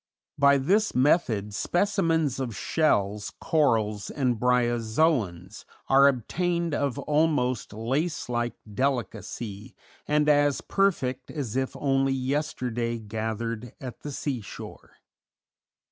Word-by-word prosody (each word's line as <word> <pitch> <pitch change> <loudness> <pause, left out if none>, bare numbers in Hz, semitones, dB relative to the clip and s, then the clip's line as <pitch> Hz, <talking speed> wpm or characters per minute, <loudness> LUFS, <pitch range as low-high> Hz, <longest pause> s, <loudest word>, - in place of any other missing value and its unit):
By 140 0 +6
this 200 +11 +1
method 125 - +2
specimens 165 - +1
of 120 -5 -3
shells, 105 -10 +1
corals, 110 -9 +1
and 125 -5 0
bryozoans 120 - +1 0.3
are 135 +1 +7
obtained 170 - 0
of 140 -2 -1
almost 145 -4 +1
lace 135 +10 -2
like 120 -1 -1 0.2
delicacy, 120 -3 -3 0.3
and 150 0 +2
as 145 -1 +4
perfect 135 -10 0
as 135 -8 -4
if 130 0 -1
only 135 -1 +1
yesterday 130 -3 -2
gathered 110 +1 -4
at 125 -2 -8
the 145 - -6
sea 135 -3 -3
shore. 100 - -10
130 Hz, 105 wpm, -26 LUFS, 115-150 Hz, 0.3 s, are